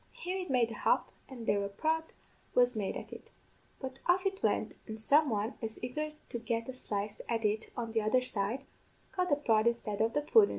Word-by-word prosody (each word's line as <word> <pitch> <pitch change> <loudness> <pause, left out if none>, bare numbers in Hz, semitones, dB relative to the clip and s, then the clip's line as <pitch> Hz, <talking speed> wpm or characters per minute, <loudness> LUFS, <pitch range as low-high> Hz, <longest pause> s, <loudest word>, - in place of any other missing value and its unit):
Here 370 +2 -3
it 365 - -4
made 245 -3 +3
a - - -7
hop, - - +2 0.2
and 245 -4 -7
there 200 -2 +2
a 200 - -2
prod 320 +10 0 0.5
was 245 0 +5
made 205 -3 -1
at - - -8
it; - - -10 0.5
but 265 -1 -6
off 365 +2 +4
it 385 0 0
went, - - +1
an' 220 -1 -5
some 285 +7 +4
one, 215 +1 0
as 220 -1 -4
eager 300 +5 -2 0.2
to 235 - -3
get 230 0 -1
a 260 - -4
slice 210 -4 -3
at 230 -2 0
it 215 +1 +1
on 230 -2 -2
the 225 0 +2
other 215 +4 +3
side, 220 +1 -1 0.5
got 365 -1 +1
the 290 - +5
prod 225 -6 +3
instead 225 -3 0
of 225 +1 +2
the 295 - +2
pudden. 415 +7 +6
235 Hz, 220 wpm, -33 LUFS, 220-290 Hz, 0.5 s, pudden